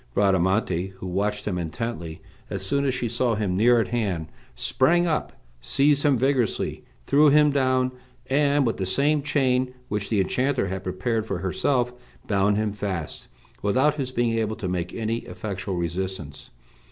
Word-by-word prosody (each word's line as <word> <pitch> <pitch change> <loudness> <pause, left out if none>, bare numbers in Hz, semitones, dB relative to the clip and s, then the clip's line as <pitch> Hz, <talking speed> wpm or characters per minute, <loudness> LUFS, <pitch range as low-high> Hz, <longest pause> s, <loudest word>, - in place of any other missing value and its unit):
Bradamante, 95 -1 +1
who 95 - -9
watched 105 +3 -1
him 90 -4 -1
intently, 85 -1 -5 0.3
as 95 -1 -3
soon 140 +8 +1
as 135 - +1
she 125 -1 -1
saw 120 0 0
him 100 -4 -1
near 120 +4 +5
at 115 - 0
hand, 95 -9 -1 0.3
sprang 175 +6 +2
up, 160 -3 -1 0.3
seized 145 +1 +2
him 145 -3 +3
vigorously, 130 -2 0 0.2
threw 150 +1 +5
him 150 +1 +5
down, 130 -2 +2 0.3
and, 145 0 +2
with 115 - 0
the 95 - -2
same 145 +8 +2
chain 130 -3 +1
which 105 -1 -2
the 110 - +1
enchanter 125 +2 +1
had 95 0 -4
prepared 105 +5 -2
for 95 - -2
herself, 120 +7 0 0.3
bound 100 0 +2
him 105 -1 0
fast, 95 -6 -4 0.3
without 130 +9 +3
his 135 -4 -4
being 120 -2 +1
able 110 -1 -1
to 105 -4 -4
make 90 -1 -2
any 115 0 -2
effectual 95 -4 -5
resistance. 85 -3 -4
110 Hz, 165 wpm, -25 LUFS, 95-130 Hz, 0.3 s, near